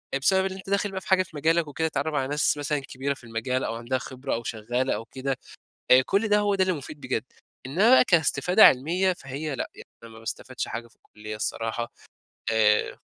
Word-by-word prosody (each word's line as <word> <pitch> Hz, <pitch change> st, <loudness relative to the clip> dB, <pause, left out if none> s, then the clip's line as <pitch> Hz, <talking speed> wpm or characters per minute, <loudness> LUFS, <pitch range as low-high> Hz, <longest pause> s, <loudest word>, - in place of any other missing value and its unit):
أ -, -, +3 dB
بسبب 190 Hz, +8 st, +3 dB
اللي 190 Hz, 0 st, -3 dB
أنت 190 Hz, 0 st, -10 dB
داخل 200 Hz, 0 st, +1 dB
بقى 190 Hz, 0 st, -4 dB
في -, -, -14 dB
حاجة 190 Hz, -1 st, +4 dB
في 170 Hz, -, -17 dB
مجالك 160 Hz, +2 st, +2 dB
وكده، 160 Hz, +3 st, -1 dB
تتعرّف 160 Hz, 0 st, -2 dB
على 135 Hz, -3 st, 0 dB
ناس 150 Hz, +1 st, +1 dB
مثلًا 145 Hz, 0 st, -1 dB
كبيرة 135 Hz, +1 st, -3 dB
في 135 Hz, -, -16 dB
المجال 120 Hz, +3 st, -2 dB
أو 115 Hz, -, -2 dB
عندها 120 Hz, +3 st, -2 dB
خبرة 130 Hz, +1 st, -5 dB
أو 120 Hz, -, -2 dB
شغّالة 120 Hz, +4 st, -1 dB
أو 115 Hz, -, -6 dB
كده. 130 Hz, +2 st, -3 dB, 0.5 s
أ 130 Hz, +1 st, +9 dB
كل 205 Hz, +3 st, +1 dB
ده، 210 Hz, 0 st, +4 dB
هو 205 Hz, -1 st, +1 dB
ده 190 Hz, -, +3 dB
اللي 185 Hz, 0 st, +1 dB
مفيد 150 Hz, -1 st, -8 dB
بجد. 130 Hz, -1 st, -2 dB, 0.4 s
إنّما 180 Hz, -, +3 dB
بقى 260 Hz, -, +8 dB
كاستفادة 180 Hz, +3 st, +5 dB
علمية، 175 Hz, +8 st, +4 dB
فهي 140 Hz, -1 st, -5 dB
لأ. -, -, -4 dB
يعني -, -, -12 dB, 0.2 s
أنا 115 Hz, -, -11 dB
ما 110 Hz, -, -12 dB
باستفادش 120 Hz, +3 st, -5 dB
حاجة 115 Hz, +1 st, -5 dB
في -, -, -26 dB
الكُلّية 110 Hz, 0 st, -9 dB
الصراحة. 115 Hz, +2 st, -3 dB, 0.6 s
آآ 105 Hz, -1 st, +2 dB
140 Hz, 220 wpm, -26 LUFS, 120-180 Hz, 0.6 s, أ